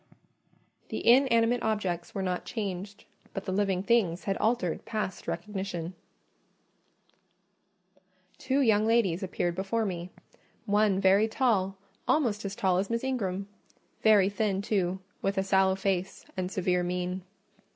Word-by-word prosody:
The - - -4
inanimate 240 -1 +5
objects 190 -6 -2
were 195 - -1
not 180 -1 -2
changed; 200 -2 -5 0.3
but 195 - -4
the 190 - -2
living 190 -1 +1
things 200 -6 +2
had 195 - -1
altered 215 -7 0
past 210 -4 -4
recognition. 190 -4 -4 2.5
Two 275 +2 +1
young 220 -4 +3
ladies 220 -7 +2
appeared 180 -2 -1
before 195 +5 -1
me; 175 -2 -4 0.6
one 205 -2 +3
very 195 +3 +4
tall, 205 -6 +1 0.3
almost 235 -9 +2
as 200 0 -4
tall 185 -3 +2
as 195 - -2
Miss 230 +1 -1
Ingram—very 205 -2 0
thin 200 -1 -1
too, 190 -3 0 0.2
with 195 0 -1
a 190 - +2
sallow 190 -1 +3
face 190 -1 -2
and 185 -1 -2
severe 180 -2 +1
mien. 180 +1 -2
195 Hz, 130 wpm, -29 LUFS, 185-220 Hz, 2.5 s, inanimate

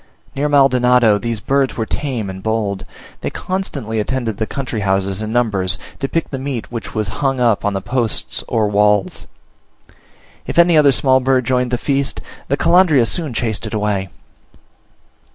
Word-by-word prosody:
Near 145 +2 0
Maldonado 125 -6 +4
these 115 -1 -3
birds 135 +3 0
were 115 - -1
tame 125 -5 -3
and 95 0 -7
bold; 105 -3 -2 0.3
they - - -3
constantly 185 - -3
attended 115 -1 -2
the 110 - -2
country 130 -5 -4
houses 95 0 0
in 110 0 -4
numbers, 100 -6 +1 0.2
to 135 - -2
pick 165 - -2
the 135 - -3
meat 130 -4 -4
which 115 -2 -6
was 110 -2 -1
hung 135 -2 +1
up 115 -4 +2
on 105 - 0
the 95 -1 -3
posts 120 -3 -1
or 110 -2 +1
walls: 105 -1 +1 1.2
if - - -4
any 170 0 +6
other 150 -2 +6
small 130 0 +3
bird 130 -1 +1
joined 125 0 +1
the 125 - 0
feast, 140 +1 0 0.3
the 140 - 0
Calandria 170 -7 +4
soon 160 +2 -2
chased 115 -1 -2
it 110 - -5
away. 105 -3 -1
120 Hz, 170 wpm, -18 LUFS, 105-135 Hz, 1.2 s, any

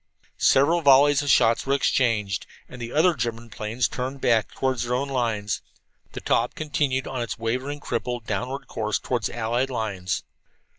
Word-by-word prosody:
Several 160 +6 +4
volleys 140 0 +6
of 145 - -3
shots 115 0 +4
were 135 - +3
exchanged, 115 -8 +1 0.2
and 125 - -11
the 120 0 -5
other 165 +5 +4
German 115 -3 -4
planes 110 +4 -1
turned 130 +2 -4
back 115 -4 +2
toward 130 -2 -1
their 120 +1 -1
own 140 +2 -1
lines. 115 -5 -1 0.5
The - - -6
Taube - - +1
continued 145 -4 -1
on 130 -2 -4
its 115 -2 -4
wavering, 130 +6 -2
crippled, 120 -2 -3
downward 130 +4 -3
course 110 -2 -1
toward 120 -3 -2
the - - -3
allied 120 +3 0
lines. 100 -7 -2
125 Hz, 165 wpm, -24 LUFS, 115-135 Hz, 0.5 s, volleys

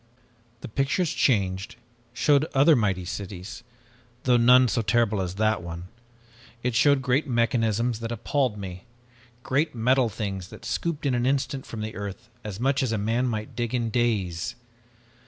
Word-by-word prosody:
"The - - -6
pictures 140 - 0
changed, 95 -6 +1 0.4
showed 140 +4 +3
other 145 +4 +6
mighty 95 -6 0
cities, 95 +3 -6 0.6
though 125 -1 +4
none 125 +2 +6
so 115 - 0
terrible 110 -1 +1
as 90 0 -4
that 110 0 +1
one. 85 +1 -7 0.7
It 125 0 0
showed 140 +3 +4
great 135 +4 +1
mechanisms 115 -1 +1
that 115 0 -4
appalled 120 0 0
me. 95 -1 -7 0.6
Giant 145 +2 +1
metal 125 +1 +3
things 100 -4 -4
that 115 - -12
scooped 150 +5 -2
in 135 - +2
an 120 0 +1
instant 135 0 -1
from 110 - -6
the 110 +1 -4
earth 100 +4 -7
as 105 -2 -6
much 135 +3 +1
as 130 -4 0
a 110 - 0
man 115 +5 0
might 110 -3 -4
dig 120 0 -2
in 115 -2 -1
days. 110 -4 0
115 Hz, 160 wpm, -26 LUFS, 105-130 Hz, 0.7 s, other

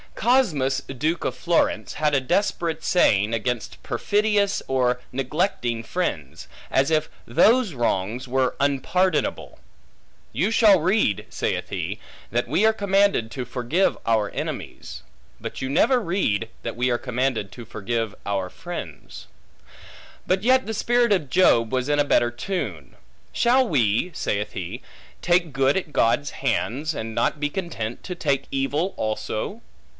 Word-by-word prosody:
Cosmus, 175 - +2
duke 155 +6 -2
of - - -1
Florence, 165 -10 0
had 150 -1 +1
a 140 - +4
desperate 170 +1 0
saying 105 - +3
against 115 +1 -3
perfidious 205 - +1
or 125 -2 +1
neglecting 130 - -1
friends, 80 - -3 0.2
as 135 +3 +2
if 155 -1 +1 0.2
those 220 - +3
wrongs 120 0 -1
were 130 0 +1
unpardonable; 145 - 0 0.7
You 195 +6 +1
shall 215 -4 +6
read 180 - +1
(saith - - -2
he) - - -4 0.3
that 120 +1 0
we 160 - +2
are 220 - +5
commanded 200 - +2
to 125 0 -4
forgive 125 +10 0
our 110 -3 +2
enemies; - - -6 0.4
but - - -6
you 130 - -2
never 250 - +3
read, 165 - -1
that 115 - -4
we 125 +2 +1
are 120 -1 +1
commanded 125 -5 -1
to 120 - -9
forgive 110 0 -3
our 95 -2 -1
friends. - - -8 1.0
But 185 +2 +1
yet 260 +2 +4
the 220 - -3
spirit 240 +1 +2
of 155 -8 -1
Job 120 -11 +4
was 130 +1 -1
in 145 0 +2
a 145 - +4
better 120 -4 +3
tune: 120 - -5 0.4
Shall 255 +2 +3
we 120 - +1
(saith 105 -7 -2
he) 95 +7 -5 0.4
take 175 -3 +2
good 135 +4 +2
at 170 -6 -4
God's 145 +6 +2
hands, 140 +3 -1
and 110 -2 -5
not 150 - 0
be 145 0 0
content 145 - -5
to 180 - -5
take 140 -5 -1
evil 145 +7 -1
also? 110 0 -3
140 Hz, 145 wpm, -24 LUFS, 120-185 Hz, 1.0 s, shall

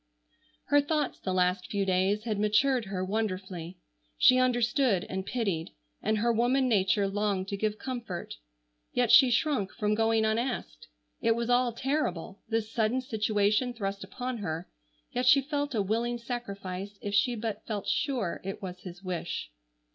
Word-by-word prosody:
Her 290 +1 +6
thoughts 295 0 -1
the 190 - -3
last 180 0 +1
few 200 -1 0
days 190 +3 +1
had 215 -3 -2
matured 235 +4 +3
her 190 -1 -3
wonderfully. 185 -4 -3 0.4
She 255 - +6
understood 240 -4 +2
and 190 0 -4
pitied, 200 -10 -1 0.3
and 215 - +1
her 235 +2 +2
woman 250 +3 +2
nature 200 -2 +2
longed 195 -1 -1
to 200 - -2
give 215 +1 -1
comfort, 235 - -5 0.6
yet 245 -2 +2
she 265 -2 +8
shrunk 240 -5 +1
from 210 -3 0
going 225 0 +2
unasked. 225 - -2 0.3
It 230 -1 +3
was 235 +1 -1
all 245 0 +3
terrible, 225 - -2
this 225 -1 -1
sudden 230 +3 +1
situation 215 0 +1
thrust 195 -3 -3
upon 250 +5 -5
her, 165 -3 -4 0.4
yet 250 +1 -1
she 270 +2 +8
felt 285 -1 -2
a 205 - +2
willing 230 +4 0
sacrifice 200 -5 -5
if 205 - -5
she 240 +4 +3
but 225 -1 -4
felt 210 -3 -3
sure 255 - -1
it 195 +2 -5
was 185 -3 -7
his 180 0 -10
wish. 175 - -4
215 Hz, 160 wpm, -29 LUFS, 195-245 Hz, 0.6 s, she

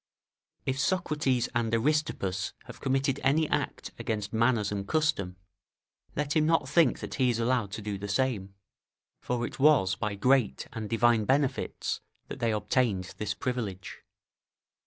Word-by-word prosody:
["If 130 +1 -1
Socrates 150 -5 +1
and 120 -2 0
Aristippus 115 -8 0
have - - -12
committed 135 0 +1
any 150 +4 +3
act - - -2
against 105 -1 -3
manners 115 -2 +2
and 100 -1 -3
custom, 150 - 0 0.8
let 150 +1 -1
him 155 -1 +3
not 165 -5 +2
think 150 -2 +3
that - - -6
he 130 -2 +2
is 120 - +1
allowed 115 -3 0
to 110 - -5
do 100 -2 -3
the 100 - -5
same; 100 -3 -1 0.7
for 120 -1 -1
it - - -8
was 135 -10 +5
by 100 +1 -2
great 125 +3 +2
and 110 -2 -5
divine 115 -1 +3
benefits 135 +1 0 0.3
that - - -6
they 115 -1 +1
obtained 105 -4 0
this 105 -1 -2
privilege." 110 -8 -4
120 Hz, 150 wpm, -29 LUFS, 105-135 Hz, 0.8 s, was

